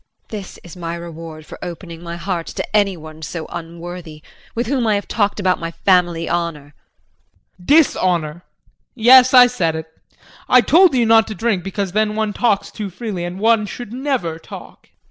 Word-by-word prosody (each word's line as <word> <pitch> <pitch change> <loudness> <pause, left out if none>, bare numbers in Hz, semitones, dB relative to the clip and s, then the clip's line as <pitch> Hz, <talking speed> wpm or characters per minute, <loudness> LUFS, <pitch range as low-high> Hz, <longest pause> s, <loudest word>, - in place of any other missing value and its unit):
JULIE. 215 - -4
This 190 - -12
is 175 - -12
my 170 -1 -5
reward 165 -2 -9
for - - -11
opening 170 -1 -8
my 170 0 -6
heart 170 -1 -4
to - - -5
anyone 165 -7 -1
so 160 +1 -5
unworthy, 170 -2 -8 0.3
with 235 +2 -1
whom 250 -2 0
I 215 - +3
have 200 - -3
talked 205 -2 0
about 185 -2 +1
my 165 - -4
family 175 -2 +1
honor. 165 -4 -3
JEAN. 180 +5 -28
Dishonor 175 - +2 0.5
yes, 255 +2 +7
I 250 -1 +10
said 180 -10 -1
it. 160 0 -5 0.6
I 255 - +7
told 325 - +5
you 240 -2 +3
not 225 0 +5
to 215 - -6
drink 205 -2 -1
because 195 0 -3
then 215 +1 0
one 215 -1 -1
talks 205 -4 0
too 210 -3 -5
freely 190 -2 -5
and 175 +1 -5
one 220 0 +3
should 230 +1 -8
never 250 - -2
talk. - - -12
185 Hz, 180 wpm, -19 LUFS, 170-225 Hz, 0.6 s, I